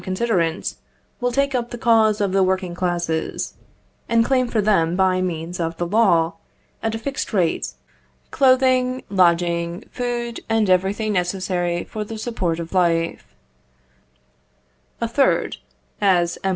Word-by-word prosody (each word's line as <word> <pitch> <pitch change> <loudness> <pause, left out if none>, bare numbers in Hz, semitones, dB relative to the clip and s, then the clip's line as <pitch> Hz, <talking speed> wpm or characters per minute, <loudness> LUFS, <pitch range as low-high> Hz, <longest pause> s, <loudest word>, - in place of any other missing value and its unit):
Considerant, 185 -4 -1 0.5
will 245 0 0
take 275 +2 +1
up 240 -2 -1
the 240 - -6
cause 225 -2 +3
of 200 -2 +1
the 195 0 +2
working 185 -1 0
classes, 175 -2 -2 0.6
and 230 0 +3
claim 255 -1 +2
for 230 - -1
them 185 -5 +2
by 185 -1 +2
means 175 -1 -4
of 165 -1 -2
the 175 - -1
law, 170 -4 +3 0.5
at 225 0 -1
a - - -2
fixed 275 +5 -4
rate, 180 -5 0 0.6
clothing, 255 -1 +3
lodging, 170 0 +2
food, 240 -1 -3
and 220 -3 +2
everything 200 +4 +1
necessary 180 -1 -1
for 215 - -5
the 220 +1 -7
support 190 -7 -2
of 165 +1 -6
life. 170 -2 0 1.6
A - - -1
third, - - +1 0.4
as, 175 -4 +2
M. 195 - +1
190 Hz, 140 wpm, -21 LUFS, 175-230 Hz, 1.6 s, cause